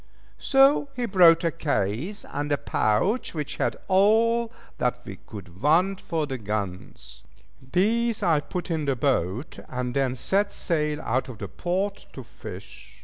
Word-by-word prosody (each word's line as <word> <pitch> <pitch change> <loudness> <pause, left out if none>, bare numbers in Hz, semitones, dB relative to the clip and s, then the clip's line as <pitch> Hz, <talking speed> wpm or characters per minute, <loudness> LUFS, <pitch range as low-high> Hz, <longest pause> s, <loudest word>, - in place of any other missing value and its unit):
So 275 +1 +4
he 245 -1 -1
brought 175 -5 +6
a 165 - +2
case 145 - -2
and 145 +1 -3
a 145 - +3
pouch 145 - 0
which 150 -2 -4
held - - 0
all 225 +4 +3 0.3
that 125 - +1
we 95 - -8
could 90 -3 -12
want 180 +7 +3
for 160 -2 -2
the 135 -3 -5
guns. 90 - -5 0.5
These 225 - +1
I 165 -5 +3
put 175 +3 -5
in 160 -2 -1
the 135 -1 +1
boat, 120 - -1
and 125 -1 -3
then 135 -1 0
set 200 +9 0
sail 150 -3 -1
out 130 +1 -1
of 120 - -8
the - - -6
port 190 +3 -3
to - - -8
fish. - - -11
155 Hz, 155 wpm, -25 LUFS, 125-195 Hz, 0.5 s, brought